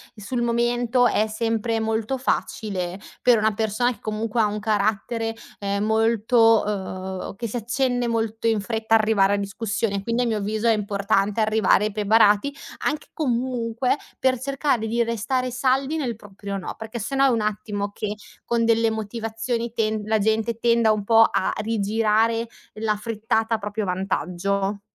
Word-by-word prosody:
sul 235 +3 -3
momento 240 +1 +2
è 215 - +2
sempre 225 +1 -1
molto 225 +4 -1
facile, 190 -7 -2 0.2
per 245 -3 +5
una 220 +1 +2
persona 220 +3 +1
che 215 - -10
comunque 215 +1 -2
ha 220 - +5
un 210 0 -2
carattere, 220 +2 0 0.2
ehm, 200 0 -2
molto 225 +1 +4
uhm, 190 -2 -4
che 235 +2 -4
si 220 - -7
accende 245 +1 0
molto 225 -1 -2
in 220 -3 +2
fretta, 225 +1 -2
arrivare 215 -3 +4
a - - +2
discussione, 200 0 -2
quindi 230 +3 0
a - - +1
mio 220 -2 0
avviso 215 +3 -1
è 225 - +5
importante 200 0 0
arrivare 215 -1 +3
preparati, 210 +5 +3 0.3
anche 300 +1 -1
comunque 250 -2 -1 0.2
per 260 -1 +2
cercare 270 -3 0
di 235 +2 0
restare 235 +3 -1
saldi 265 +4 +1
nel 250 -6 -2
proprio 200 -1 -7
"no", - - -6
perché 220 +1 -6
se 225 +6 -3
no 270 0 +4
è 270 - +5
un 230 -3 +1
attimo 210 -1 -2
che 205 0 -4 0.3
con 235 -1 +1
delle 230 0 +3
motivazioni 225 +2 -3
ten 215 -2 0
la 220 0 +1
gente 220 +2 0
tenda 235 -1 +3
un 215 -1 0
po' 225 +2 +6
a 190 - +1
rigirare 225 +1 +1 0.3
la 215 0 -1
frittata 225 +1 -1
a - - -1
proprio 205 0 -3
vantaggio. 195 +2 -1
220 Hz, 160 wpm, -23 LUFS, 210-235 Hz, 0.3 s, po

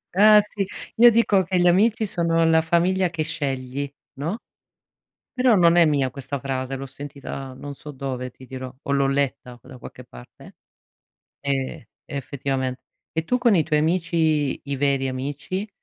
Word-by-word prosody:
Eh, 210 +2 +8
sì. 205 -1 -3 0.3
Io 240 +1 +9
dico 220 -4 +3
che 185 +1 -1
gli 175 - +3
amici 215 +5 +3
sono 165 -3 +1
la 160 0 +4
famiglia 175 +3 +2
che 160 -2 -2
scegli, 140 -2 -4 0.3
no? 170 +11 -3 0.9
Però 250 -2 +3
non 170 -3 +5
è 170 -1 +6
mia 140 -4 +1
questa 140 +2 -6
frase, 130 0 -3
l'ho 135 +1 -6
sentita 135 -1 -8
non 140 +2 -8
so 150 +3 -10
dove, 130 -2 -5
ti 130 - -15
dirò, 130 0 -7
o 140 - -4
l'ho 140 -1 +2
letta 135 -3 -2
da 130 +1 -13
qualche - - -11
parte, - - -14 0.9
ehm, 135 -3 -2 0.2
effettivamente. 135 -2 -3 0.3
E 160 0 -2
tu 250 +8 +1
con 235 -5 +4
i 160 - +3
tuoi 150 -1 +1
amici, 160 -3 +1
i 140 0 -3
veri 135 -1 +1
amici, 145 +10 -4
145 Hz, 165 wpm, -23 LUFS, 135-175 Hz, 0.9 s, Io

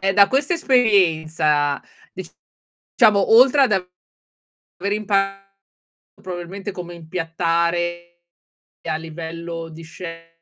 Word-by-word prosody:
ehm, 195 0 0
da 200 -1 +6
questa 280 +5 0
esperienza, 160 - +2 0.3
diciamo, 210 -3 -1
oltre 270 +4 +6
ad 250 - +3
aver 180 -2 -5 0.8
imparato 195 -2 -1 0.7
probabilmente 185 +3 -6
come 175 -2 -8
impiattare 170 +1 -2 0.7
a 155 - 0
livello 165 +1 -7
di 165 +1 -11
chef, 165 +1 -9
175 Hz, 90 wpm, -21 LUFS, 165-200 Hz, 0.8 s, da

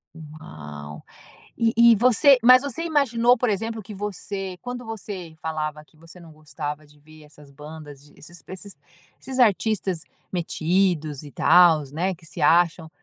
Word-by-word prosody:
Uau. 75 - -11 0.5
E 230 -1 +1
e 235 0 +6
você, 255 +4 +5
mas 255 +2 +7
você 285 +3 -4
imaginou, 250 -7 +2
por 245 -1 0
exemplo, 225 +2 -3
que 210 +2 -11
você 195 -2 -6
quando 245 -1 -7
você 195 -7 -8
falava 155 -1 -4
que 155 - -28
você 165 +3 -16
não 165 -2 -14
gostava 150 0 -7
de 145 0 -23
ver 155 +1 -17
essas 150 -1 -18
bandas, 150 -1 -12
desses 170 +1 -11
esses 190 -1 -9 0.4
esses 265 0 -6
artistas 200 -6 +1 0.3
metidos 170 -3 -1
e 145 - -11
tals, 160 -6 +4
né, 180 +4 -2
que 165 - -19
se 160 0 -8
acham, 165 +1 +2
175 Hz, 150 wpm, -23 LUFS, 155-220 Hz, 0.5 s, mas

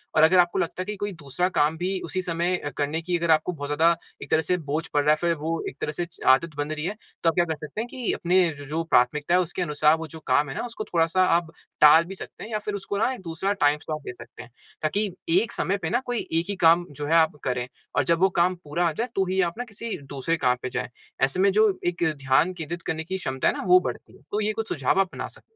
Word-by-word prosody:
और 155 - +5
अगर 180 +3 +6
आपको 175 -1 +3
लगता 180 +2 -2
है 210 - -2
कोई 205 +1 -3
दूसरा 140 +6 -1
काम 155 -2 +1
भी 185 +3 -1
उसी 185 - -3
समय 175 +1 0 0.2
करने 150 +3 -1
की 175 +1 -1
अगर 170 -1 +1
आपको 155 +3 +3
बहुत 145 -4 -6
ज़्यादा 165 +3 +3 0.3
एक - - -12
तरह 160 - +4
से 180 +3 0
बोझ 155 +3 -1
पड़ 145 - +1
रहा 150 - +4
है - - +5
फिर 170 -1 +2
वो 160 +2 -3 0.2
एक - - -15
तरह - - -1
से 175 +3 -3 0.3
आदत 150 +3 0
बन 145 +1 -2
रही 155 0 -3
है 200 +4 -2 0.3
तो 165 - +5
आप 165 - -2
क्या 175 - +3
कर 160 -2 -2
सकते 155 +7 -6
है 235 - -4
कि 250 -4 -2
अपने 180 +2 +2 0.2
ज 145 - -8
जो 160 +2 -1
प्राथमिकताएँ 150 +3 +2
है - - +4
उसके 175 +2 -5
अनुसार 150 -2 +3
वो 160 0 -6
जो 160 +2 -10
काम 145 -1 +3
है 135 - -6
ना - - -2
उसको 230 -2 -6
थोड़ा-सा 170 +2 +3
अब 170 -2 -5 0.3
टाल 150 +2 +8
भी 190 +3 -8
सकते - - -10
है 215 - -8
या 215 - -1
फिर 210 0 -5
उसको 200 0 -4
ना 250 +5 +1
दूसरा 175 +4 -1
टाइम 150 -6 +2
स्लॉट 155 0 -5
दे - - -6
सकते 120 0 -12
है। 125 - -15 0.3
ताकि 205 +7 +1 0.2
एक 190 +7 +3
समय 200 - -1
पे 160 -5 -3
ना 240 +5 +2
कोई 245 -2 -1
एक 165 +1 +1
ही 200 - -1
काम 170 +2 +6
जो 145 - -2
है 160 - +1
आप 160 -2 +4
करें 125 -1 -1 0.3
और 145 - +3
जब 165 +4 +2
वो 190 +2 +4
काम 180 +2 +3
पूरा 170 +4 0
आ - - +1
जाए 235 +10 -2
तो 195 - +2
ही 190 +1 +2
आप - - -14
न 245 - -2
किसी 220 +2 -5 0.2
दूसरे 150 +5 -1
काम 125 -4 +2
पे 130 - -3
जाये - - -3 0.4
ऐसे 135 +7 -3
में 195 +1 +4
जो 215 +2 +4 0.2
एक 175 -1 -1 0.2
ध्यान 135 +7 +3
केंद्रित 170 0 -6
करने 160 0 -2
की 190 +4 -4
क्षमता 130 -7 -1
है - - +3
ना 285 - -4
वो 365 0 +8
बढ़ती - - -10
है। - - -25
तो 210 - 0
ये 215 +1 0
कुछ 225 +1 -4
सुझाव 135 +2 0
अपना 195 -2 -1
सकें। - - -16
165 Hz, 275 wpm, -25 LUFS, 150-190 Hz, 0.4 s, टाल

